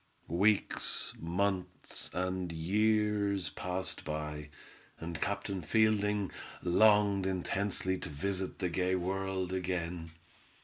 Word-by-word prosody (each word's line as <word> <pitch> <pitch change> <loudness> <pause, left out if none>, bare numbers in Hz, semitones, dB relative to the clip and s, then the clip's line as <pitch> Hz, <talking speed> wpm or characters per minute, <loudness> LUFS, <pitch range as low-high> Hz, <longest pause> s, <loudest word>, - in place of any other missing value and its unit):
Weeks, 100 +5 +3
months, 90 +3 -2
and 90 -1 -2
years 100 +2 +1
passed 90 +1 -4
by, 75 -1 -4 0.5
and 80 -1 -5
Captain 100 -1 -2
Fielding 105 +2 +2 0.3
longed 100 +1 +4
intensely 95 0 0
to - - -6
visit 95 +5 -2
the 90 -3 -1
gay 90 +2 +1
world 95 0 -2
again. 90 -2 -2
95 Hz, 95 wpm, -32 LUFS, 90-100 Hz, 0.5 s, longed